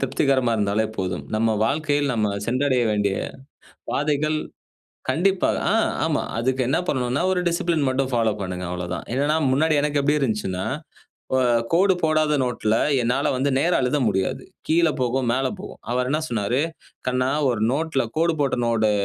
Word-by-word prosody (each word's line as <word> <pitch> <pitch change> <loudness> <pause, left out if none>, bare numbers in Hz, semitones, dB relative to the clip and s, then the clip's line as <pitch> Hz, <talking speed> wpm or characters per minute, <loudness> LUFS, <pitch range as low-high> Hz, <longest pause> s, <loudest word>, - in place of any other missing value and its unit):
திருப்திகரமா 130 -2 +1
இருந்தாலே 105 +1 +1
போதும். 90 -2 -3
நம்ம 110 0 +2
வாழ்க்கையில் 145 +1 0
நம்ம 105 -3 0
சென்றடைய 130 +1 +1
வேண்டிய 100 -2 +1 0.7
பாதைகள் 150 +1 0 0.7
கண்டிப்பா 185 +7 +2 0.2
ஆ - - +2 0.3
ஆமா. 155 -3 0 0.2
அதுக்கு 130 +3 0
என்ன 145 - +2
பண்ணணுனா, 125 -1 0
ஒரு 180 - +1
டிசிப்ளின் 170 -3 0
மட்டும் 130 0 -1
ஃபாலோப் 110 -3 +1
பண்ணுங்க 90 -1 -4
அவ்வளவுதான். 90 0 -4
என்னன்னா 145 +4 +1 0.2
முன்னாடி 155 +4 +2
எனக்கு 145 -1 +1
எப்பிடி 150 +2 +2
இருந்துச்சுன்னா 105 -7 -1 0.7
இப்ப 130 0 +3 0.3
கோடு 190 +3 +4
போடாத 155 -2 +2
நோட்ல 115 -3 0 0.3
என்னால 120 +2 +1
வந்து 135 +2 0
நேரா 170 +5 +2
எழுத 125 +4 +1
முடியாது. 95 0 0 0.2
கீழ 165 +1 +3
போகும், 125 0 0
மேல 130 +3 +1
போகும். 200 - -9
அவரு 125 +1 0
என்ன 150 - +1
சொன்னாரு, 115 -1 -1 0.5
கண்ணா! 125 0 +1 0.2
ஒரு 120 -3 -2
நோட்ல 150 -1 0
கோடு 165 +1 +3
போட்ட 140 -3 +1
நோடு, 115 -2 +2
130 Hz, 150 wpm, -23 LUFS, 115-150 Hz, 0.7 s, கோடு